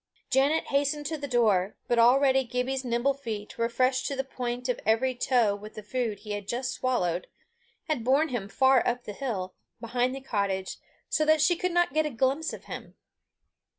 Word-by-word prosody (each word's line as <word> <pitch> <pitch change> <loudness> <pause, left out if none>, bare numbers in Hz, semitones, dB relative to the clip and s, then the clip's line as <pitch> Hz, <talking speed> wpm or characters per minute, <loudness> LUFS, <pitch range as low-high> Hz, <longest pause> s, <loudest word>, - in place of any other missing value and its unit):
Janet 275 +5 +3
hastened 285 +1 0
to 315 +2 -2
the 285 - -4
door, 215 -6 +2
but 240 - +2
already 265 +3 +5
Gibbie's 250 +2 -2
nimble 240 +3 +1
feet 225 -6 -7
refreshed 255 +3 +1
to 280 - -2
the 270 - -1
point 250 -1 -4
of 250 - -1
every 225 +4 +2
toe 240 -4 +2
with 210 +1 -11
the 215 - -8
food 225 -1 -2
he 210 0 -8
had 205 -1 -4
just 250 +3 -2
swallowed, 180 -9 -1 0.6
had 305 -8 -2
borne 275 +6 +3
him 225 -6 -3
far 265 +3 +4
up 245 0 -1
the 210 - -7
hill, 195 -7 -4 0.3
behind 245 +2 -1
the - - -5
cottage, 200 -6 -2 0.3
so 310 - +1
that 310 0 +4
she 335 +4 +4
could 365 +2 -1
not 350 -4 +2
get 310 0 +2
a - - -2
glimpse 270 +5 0
of - - -9
him. - - -8
250 Hz, 190 wpm, -28 LUFS, 225-275 Hz, 0.6 s, already